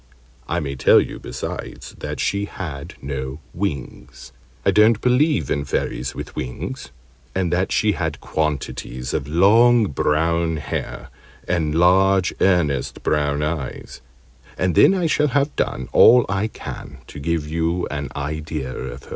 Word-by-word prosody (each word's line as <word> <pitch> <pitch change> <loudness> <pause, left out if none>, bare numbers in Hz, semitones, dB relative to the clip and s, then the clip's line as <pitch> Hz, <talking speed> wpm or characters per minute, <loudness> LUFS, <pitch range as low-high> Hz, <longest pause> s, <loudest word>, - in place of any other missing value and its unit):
I 85 - 0
may 70 -4 -4
tell 65 - +6
you, - - -3
besides, - - -6
that - - -5
she 100 0 0
had 80 -9 -7
no 65 0 -4
wings 70 -6 -5 0.3
(I - - +5
don't 110 +1 +5
believe 135 +5 +2
in 70 - 0
Fairies 70 - -3
with - - -7
wings), 60 -1 -5 0.5
and 90 -2 0
that 90 +2 0
she 105 - +2
had 80 -7 -3
quantities 70 -4 -3
of - - -2
long 110 +7 +5
brown 80 +3 +1
hair 75 - -5 0.4
and 80 -4 0
large 95 +2 +4
earnest 80 -9 +1
brown 75 -1 +1
eyes, 75 -4 -4 0.6
and 90 0 +1
then 195 - +6
I 180 -3 0
shall 150 -1 +2
have 140 +2 0
done 65 - -2
all 125 0 +7
I 100 +2 0
can 90 - -8
to - - -10
give 80 0 -1
you 85 +3 -1
an 70 -1 -4
idea 75 -2 -4
of 65 +1 -7
her. - - -15
80 Hz, 145 wpm, -21 LUFS, 70-95 Hz, 0.6 s, all